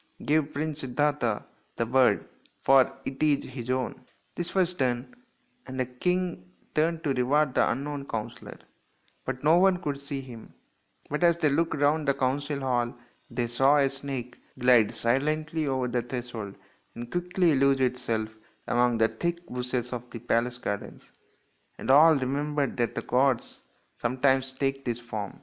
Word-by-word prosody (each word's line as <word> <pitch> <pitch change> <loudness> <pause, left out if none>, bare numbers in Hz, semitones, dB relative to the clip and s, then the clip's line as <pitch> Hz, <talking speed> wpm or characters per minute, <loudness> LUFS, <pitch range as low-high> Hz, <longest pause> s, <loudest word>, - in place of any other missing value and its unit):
Give 150 0 +2
Prince 155 +1 -3
Siddartha 135 -4 0 0.3
the 115 - 0
bird, 130 +2 +3 0.4
for 135 0 +5
it 135 - -5
is 150 -2 +3
his 125 -2 -7
own." 130 -1 -2 0.3
This 175 +2 -4
was 180 -2 +2
done, 125 -4 -1 0.5
and 130 0 -6
the 130 - +1
king 175 - -2 0.2
turned 165 +1 +1
to 140 - +1
reward 135 +2 +2
the - - +3
unknown 140 +1 -3
counsellor, 115 +1 -6 0.7
but 130 0 -4
no 160 +3 +5
one 190 0 +4
could 145 -5 -3
see 140 0 -5
him; 125 -4 -11 0.6
but 150 +4 -1
as 170 -1 +5
they 155 -3 +2
looked 165 +3 +1
round 145 +1 +2
the 140 - +3
council 140 +2 -1
hall 120 -3 0 0.3
they 120 - -1
saw 135 +5 +3
a 135 -2 +3
snake 135 -3 -6 0.2
glide 125 -4 +5
silently 155 +5 0
over 130 -2 0
the 120 0 0
threshold 120 -4 -6 0.4
and 120 0 -7
quickly 175 -1 +2
lose 135 0 +3
itself 125 -4 0 0.4
among 120 -1 +2
the 110 0 +4
thick 170 +6 -3
bushes 125 0 -3
of 125 0 -6
the - - -7
palace 120 +1 0
garden; 100 -4 -4 0.8
and - - 0
all 155 +3 +8
remembered 140 +1 -1
that 120 -1 -1
the - - -3
gods 130 -1 +1 0.4
sometimes 130 +2 +1
take 135 0 -2
this 120 -2 -2
form. 110 -4 -6
135 Hz, 160 wpm, -27 LUFS, 125-150 Hz, 0.8 s, all